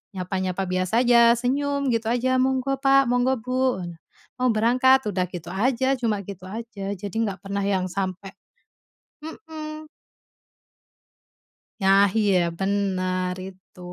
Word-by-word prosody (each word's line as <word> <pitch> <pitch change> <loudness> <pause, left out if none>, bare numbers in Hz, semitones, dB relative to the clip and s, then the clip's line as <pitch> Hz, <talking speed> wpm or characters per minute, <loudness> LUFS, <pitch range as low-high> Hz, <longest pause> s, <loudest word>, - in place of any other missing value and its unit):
nyapa-nyapa 185 0 -2
biasa 185 +7 +1
aja, 235 -1 +6
senyum 280 +2 -1
gitu 225 -1 -1
aja, 255 +2 +1
"Monggo 265 +1 0
Pak, 275 -1 +4
monggo 250 +2 +2
Bu, 255 -4 -1 0.6
mau 255 - +2
berangkat," 255 +4 +3
udah 180 -1 -1
gitu 175 0 -7
aja, 260 +6 +1
cuma 215 -4 -1
gitu 185 -1 -9
aja. 205 -2 -6
Jadi 200 +1 -8
nggak 195 0 -6
pernah 200 0 -3
yang 190 -2 0
sampai 195 0 -4 0.9
hmm. 310 -1 -8 2.0
Nah, 195 +1 +5 0.2
iya, 200 -3 +3 0.2
benar 185 -2 -1
itu. 185 0 -16
220 Hz, 120 wpm, -24 LUFS, 190-260 Hz, 2.0 s, aja